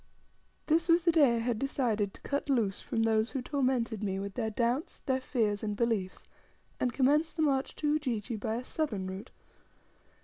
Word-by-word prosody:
This 330 Hz, +2 st, +2 dB
was 335 Hz, +1 st, +5 dB
the 335 Hz, -, +4 dB
day 285 Hz, -7 st, +5 dB
I -, -, 0 dB
had 230 Hz, -1 st, -1 dB
decided 230 Hz, -7 st, 0 dB
to -, -, -14 dB
cut 280 Hz, +1 st, -2 dB
loose 225 Hz, -8 st, +1 dB
from 225 Hz, -, -1 dB
those 220 Hz, 0 st, +2 dB
who 265 Hz, -, -3 dB
tormented 255 Hz, -6 st, 0 dB
me 195 Hz, -2 st, -1 dB
with 200 Hz, 0 st, -4 dB
their 225 Hz, -3 st, -1 dB
doubts, 240 Hz, +7 st, -1 dB
their 260 Hz, -2 st, 0 dB
fears, 215 Hz, -6 st, 0 dB
and 210 Hz, -1 st, -2 dB
beliefs, 210 Hz, -5 st, -1 dB, 0.5 s
and 250 Hz, -, +1 dB
commence 290 Hz, +5 st, +3 dB
the 315 Hz, -, -1 dB
march 275 Hz, -3 st, +1 dB
to 300 Hz, -, -2 dB
Ujiji 250 Hz, -7 st, -1 dB
by 220 Hz, +1 st, -2 dB
a 245 Hz, +2 st, -4 dB
southern 240 Hz, -, -2 dB
route. 190 Hz, +5 st, -6 dB
240 Hz, 190 wpm, -31 LUFS, 215-280 Hz, 0.5 s, was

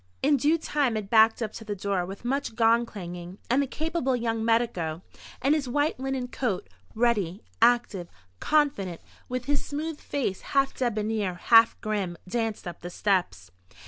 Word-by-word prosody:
In 285 Hz, +1 st, +4 dB
due 300 Hz, +6 st, +3 dB
time 285 Hz, -7 st, 0 dB
it 205 Hz, -2 st, -5 dB
backed 225 Hz, +1 st, +5 dB
up 215 Hz, -, -4 dB
to 225 Hz, -, -8 dB
the 210 Hz, -1 st, -4 dB
door 195 Hz, -2 st, -1 dB
with 195 Hz, +5 st, -9 dB
much 270 Hz, -2 st, -1 dB
gong 230 Hz, +1 st, +4 dB
clanging, 180 Hz, -2 st, -8 dB
and 265 Hz, +3 st, +4 dB
the 280 Hz, -, -1 dB
capable 310 Hz, -2 st, -1 dB
young 230 Hz, -2 st, -1 dB
medico, 185 Hz, -8 st, 0 dB, 0.4 s
in 275 Hz, +3 st, +4 dB
his 290 Hz, -5 st, -1 dB
white 290 Hz, +2 st, 0 dB
linen 265 Hz, -1 st, -2 dB
coat, 240 Hz, -7 st, -2 dB, 0.3 s
ready, 215 Hz, -5 st, +1 dB, 0.2 s
active, 230 Hz, -7 st, +3 dB, 0.3 s
confident, 275 Hz, -, +1 dB, 0.3 s
with 250 Hz, 0 st, -3 dB
his 285 Hz, 0 st, 0 dB
smooth 305 Hz, +1 st, -4 dB
face 250 Hz, -10 st, -2 dB, 0.2 s
half 275 Hz, 0 st, +3 dB
debonair, 215 Hz, -5 st, -1 dB
half 225 Hz, +6 st, +5 dB
grim, 200 Hz, -5 st, -2 dB
danced 225 Hz, -1 st, -2 dB
up 175 Hz, -, -7 dB
the 175 Hz, -, -6 dB
steps. 175 Hz, -, -1 dB
225 Hz, 165 wpm, -27 LUFS, 195-265 Hz, 0.4 s, backed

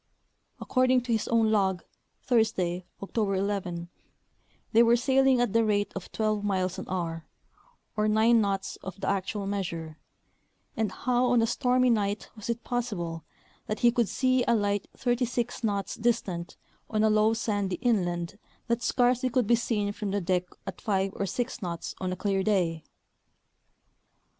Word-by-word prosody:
According 255 Hz, -1 st, +2 dB
to 245 Hz, 0 st, -4 dB
his 220 Hz, -2 st, 0 dB
own 225 Hz, -2 st, +3 dB
log, 190 Hz, -4 st, +1 dB, 0.4 s
Thursday, 185 Hz, -7 st, +1 dB, 0.2 s
Octo 220 Hz, +3 st, -1 dB
ber 195 Hz, -1 st, 0 dB
11, 190 Hz, -3 st, -2 dB, 0.8 s
they 230 Hz, -, +6 dB
were 235 Hz, 0 st, +6 dB
sailing 265 Hz, +1 st, +3 dB
at 240 Hz, -4 st, +1 dB
the 230 Hz, 0 st, +4 dB
rate 205 Hz, -2 st, 0 dB
of 195 Hz, -, -7 dB
twelve 215 Hz, -2 st, 0 dB
miles 185 Hz, -3 st, -1 dB
an -, -, -7 dB
hour, 165 Hz, -3 st, -3 dB, 0.7 s
or 210 Hz, 0 st, +1 dB
nine 220 Hz, +2 st, +4 dB
knots 195 Hz, -2 st, -2 dB
of 190 Hz, +1 st, -9 dB
the 195 Hz, -, -4 dB
actuifl 200 Hz, +1 st, -1 dB
measure, 170 Hz, -6 st, -4 dB, 0.8 s
and 220 Hz, -2 st, 0 dB
how 250 Hz, 0 st, +1 dB
on 240 Hz, -2 st, +4 dB
a -, -, +4 dB
stormy 250 Hz, +1 st, +2 dB
night 205 Hz, -2 st, -1 dB
was 215 Hz, +1 st, -8 dB
it 235 Hz, 0 st, -2 dB
possible 180 Hz, -10 st, -3 dB, 0.4 s
that 215 Hz, -, -3 dB
he 240 Hz, -, +6 dB
could 235 Hz, -3 st, +1 dB
see 255 Hz, -1 st, +2 dB
a 235 Hz, -, +4 dB
light 205 Hz, -2 st, 0 dB
thirty 245 Hz, 0 st, +1 dB
six 240 Hz, 0 st, -3 dB
knots 200 Hz, -3 st, -1 dB
distant 200 Hz, -7 st, -1 dB, 0.3 s
on 215 Hz, -1 st, +1 dB
a 220 Hz, -, +5 dB
low 215 Hz, +1 st, +3 dB
sandy 205 Hz, -4 st, -1 dB
inland 175 Hz, -5 st, -1 dB, 0.3 s
that 235 Hz, 0 st, 0 dB
scarcely 250 Hz, 0 st, +2 dB
could 250 Hz, -1 st, +1 dB
be 235 Hz, -, +3 dB
seen 220 Hz, -3 st, 0 dB
from 210 Hz, -2 st, -4 dB
the 200 Hz, +1 st, 0 dB
deck 180 Hz, -1 st, 0 dB, 0.2 s
at 195 Hz, -2 st, -7 dB
five 195 Hz, -3 st, 0 dB
or 195 Hz, -, -2 dB
six 245 Hz, +5 st, -3 dB
knots 170 Hz, -3 st, -4 dB
on 185 Hz, -1 st, -2 dB
a -, -, -2 dB
clear 195 Hz, +1 st, 0 dB
day 180 Hz, -6 st, +1 dB
210 Hz, 165 wpm, -28 LUFS, 190-235 Hz, 0.8 s, they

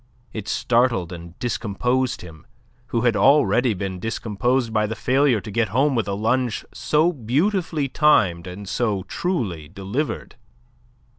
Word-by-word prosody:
It 105 Hz, -2 st, -6 dB
startled 115 Hz, -8 st, +1 dB
and 85 Hz, 0 st, -10 dB
discomposed 125 Hz, +2 st, -1 dB
him, 80 Hz, -3 st, -13 dB, 0.4 s
who 115 Hz, -2 st, -1 dB
had 120 Hz, -2 st, +2 dB
already 125 Hz, -3 st, +4 dB
been 95 Hz, -1 st, -4 dB
discomposed 115 Hz, +3 st, -1 dB
by 105 Hz, -1 st, +2 dB
the 110 Hz, -, -4 dB
failure 130 Hz, -2 st, +2 dB
to 105 Hz, -, -8 dB
get 115 Hz, +1 st, +1 dB
home 135 Hz, +8 st, +2 dB
with 115 Hz, -4 st, 0 dB
a 100 Hz, -, -1 dB
lunge 115 Hz, +3 st, 0 dB
so 160 Hz, +4 st, +2 dB
beautifully 155 Hz, -, 0 dB
timed 100 Hz, -, +3 dB
and 95 Hz, +3 st, -8 dB
so 105 Hz, -3 st, -1 dB
truly 105 Hz, -, -3 dB
delivered. 100 Hz, -, -4 dB
115 Hz, 140 wpm, -22 LUFS, 100-130 Hz, 0.4 s, already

